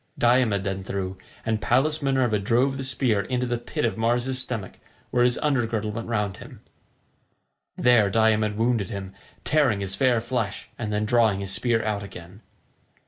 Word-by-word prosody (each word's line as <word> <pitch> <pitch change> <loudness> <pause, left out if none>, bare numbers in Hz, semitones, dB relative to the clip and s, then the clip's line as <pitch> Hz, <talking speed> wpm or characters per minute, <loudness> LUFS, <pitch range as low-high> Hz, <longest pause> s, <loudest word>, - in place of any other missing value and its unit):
Diomed 120 -5 +3
then 95 -1 -3
threw, 95 -1 -4 0.3
and 110 -1 0
Pallas 150 +7 +2
Minerva 130 -6 +1
drove 120 +7 +2
the 135 - -4
spear 125 -5 +1
into 125 +4 -2
the 120 -1 -2
pit 120 - -3
of 115 0 -2
Mars's 120 +3 +1
stomach 115 -7 -5 0.3
where 125 -1 +3
his 125 0 +3
under 135 -6 +2
girdle 110 -2 -2
went 115 +2 -5
round 105 -4 -1
him. - - -12 1.2
There 120 -5 +4
Diomed 110 -1 +2
wounded 115 -4 +1
him, 95 -1 -6 0.3
tearing 140 -9 +2
his 95 -1 -4
fair 120 +3 +2
flesh 115 -3 -3
and 110 -3 -4
then 105 0 0
drawing 110 -3 +3
his 95 -1 -3
spear 115 -1 +1
out 105 -2 -1
again. 95 0 -11
115 Hz, 170 wpm, -25 LUFS, 100-125 Hz, 1.2 s, There